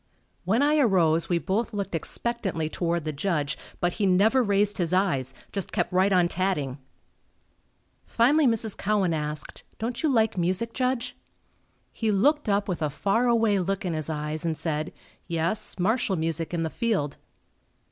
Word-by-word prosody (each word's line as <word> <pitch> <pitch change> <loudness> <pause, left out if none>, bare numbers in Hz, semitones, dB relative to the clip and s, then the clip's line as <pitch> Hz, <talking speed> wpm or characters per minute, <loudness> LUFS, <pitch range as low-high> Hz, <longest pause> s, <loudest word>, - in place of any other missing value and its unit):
When 225 +9 +2
I 300 +1 +3
arose 170 - +3
we 175 - +2
both 205 +8 -1
looked 200 -2 -3
expectantly 190 -1 -2
toward 170 -1 -1
the 155 - -2
Judge, 150 -2 -1 0.2
but 175 0 0
he 205 -3 0
never 205 +8 +4
raised 205 -2 +1
his 175 -1 0
eyes 140 -10 +1 0.2
just 195 -2 -3
kept - - -1
right 190 +2 +3
on 180 -2 +4
tatting. 170 -8 -1 1.2
Finally 275 +5 +3
Mrs. 225 -3 0
Cowan 200 -4 +1
asked, 150 -1 -3 0.2
"Don't 235 +2 -3
you 315 - +2
like 225 -6 +2
music, 185 +7 0
Judge?" 250 -1 -1 0.8
He 225 -2 0
looked 285 +7 +2
up 200 0 +1
with 180 -4 -3
a 150 - +1
far 200 - +1
away 225 -4 +3
look 195 +3 -2
in 175 - -1
his 155 0 -3
eyes 150 0 -3
and 165 -2 -1
said, 155 0 -2 0.4
"Yes, 170 +4 -2
martial 205 +2 +1
music 165 -1 -2
in 170 -2 -1
the 160 - -2
field." 210 - -1
190 Hz, 165 wpm, -26 LUFS, 165-225 Hz, 1.2 s, never